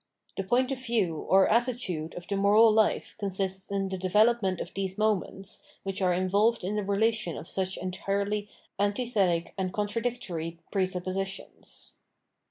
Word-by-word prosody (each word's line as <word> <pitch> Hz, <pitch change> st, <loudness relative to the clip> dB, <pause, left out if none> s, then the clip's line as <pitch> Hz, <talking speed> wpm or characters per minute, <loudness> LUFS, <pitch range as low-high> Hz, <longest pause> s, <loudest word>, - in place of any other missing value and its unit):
The 195 Hz, -, -2 dB
point 250 Hz, +7 st, +2 dB
of 260 Hz, -1 st, -4 dB
view 220 Hz, -9 st, +1 dB
or 190 Hz, 0 st, +6 dB
attitude 225 Hz, -9 st, 0 dB
of 175 Hz, -, -8 dB
the 200 Hz, -, -1 dB
moral 210 Hz, +3 st, +6 dB
life 215 Hz, 0 st, +2 dB
consists 190 Hz, -1 st, -2 dB
in 195 Hz, -1 st, -1 dB
the 190 Hz, -1 st, -4 dB
development 195 Hz, 0 st, +3 dB
of 175 Hz, -, -6 dB
these 190 Hz, 0 st, -3 dB
moments, 200 Hz, -2 st, 0 dB, 0.2 s
which 195 Hz, 0 st, -4 dB
are 185 Hz, -1 st, +3 dB
involved 200 Hz, +6 st, +2 dB
in 195 Hz, +3 st, -2 dB
this 210 Hz, -2 st, -2 dB
relation 215 Hz, -3 st, +1 dB
of -, -, -8 dB
such 190 Hz, 0 st, -2 dB
entirely 200 Hz, +3 st, -2 dB, 0.3 s
antithetic 205 Hz, -5 st, +1 dB
and 185 Hz, -1 st, -1 dB
contradictory 205 Hz, -6 st, -2 dB
presuppo 185 Hz, -2 st, -1 dB
sitions. 195 Hz, 0 st, -6 dB
195 Hz, 150 wpm, -28 LUFS, 185-215 Hz, 0.3 s, or